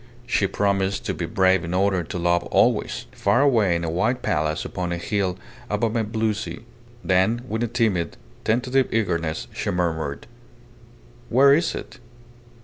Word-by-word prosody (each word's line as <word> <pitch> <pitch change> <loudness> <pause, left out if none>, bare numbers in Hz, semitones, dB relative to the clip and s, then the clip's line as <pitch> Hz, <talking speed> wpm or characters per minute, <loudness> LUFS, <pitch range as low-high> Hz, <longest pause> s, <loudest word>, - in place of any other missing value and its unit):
She 115 -5 +1
promised 100 -1 0
to - - -1
be - - -4
brave 95 0 +3
in 85 +1 -3
order 95 -1 +2
to 85 - -6
be 85 - -4
loved 85 0 +2
always - - +2
far 100 +6 +2
away 110 -11 +3
in 85 - -2
a 85 - -1
white 110 +9 0
palace 75 +1 0
upon 90 -2 -3
a 85 - -1
hill 95 0 -1 0.3
above 110 +2 0
a 115 - +1
blue 110 0 0
sea. 105 - -6 0.4
Then 95 +6 +2
with 110 0 -2
a 120 - +1
timid, 110 -8 0 0.3
tentative 125 +3 +1
eagerness 85 -8 -1
she - - -3
murmured 80 -5 -2 1.0
"Where 140 +3 +6
is 165 +4 +1
it? - - -8
100 Hz, 165 wpm, -23 LUFS, 85-115 Hz, 1.0 s, Where